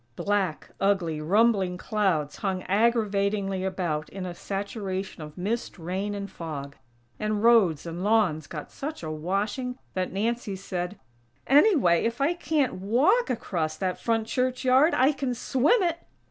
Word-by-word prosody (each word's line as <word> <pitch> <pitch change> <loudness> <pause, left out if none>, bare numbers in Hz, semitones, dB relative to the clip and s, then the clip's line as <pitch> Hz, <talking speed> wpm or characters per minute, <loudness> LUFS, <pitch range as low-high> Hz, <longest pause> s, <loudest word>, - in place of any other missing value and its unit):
Black, 200 -6 -1
ugly, 175 -6 +1
rumbling 195 +1 +2
clouds 185 -8 0
hung 190 -3 -2
aggravatingly 200 -3 +1
about 175 -6 -2
in 190 -1 -6
a 180 - -5
saturation 195 -1 -4
of 150 0 -9
mist, 210 +6 -3
rain 190 +4 -3
and 200 0 -4
fog; 150 -6 -7 0.4
and 215 0 -1
roads 210 -11 +4
and 170 +2 -5
lawns 200 -8 +2
got 150 -3 -7
such 300 - -6
a 155 - -3
washing 200 - -2 0.2
that 185 -1 -2
Nancy 220 +1 -1
said: 185 0 -4 0.5
"Anyway, 280 - +5
if 230 +2 -1
I 285 +5 +2
can't 300 - -1
walk 285 - +3
across 165 -10 -2
that 185 +1 -2
front 225 -1 0
church 255 +2 -1
yard, 265 +6 +5
I 260 +3 +4
can 270 -3 -2
_swim 265 - +2
it!! 340 0 -2
200 Hz, 145 wpm, -26 LUFS, 180-235 Hz, 0.5 s, Anyway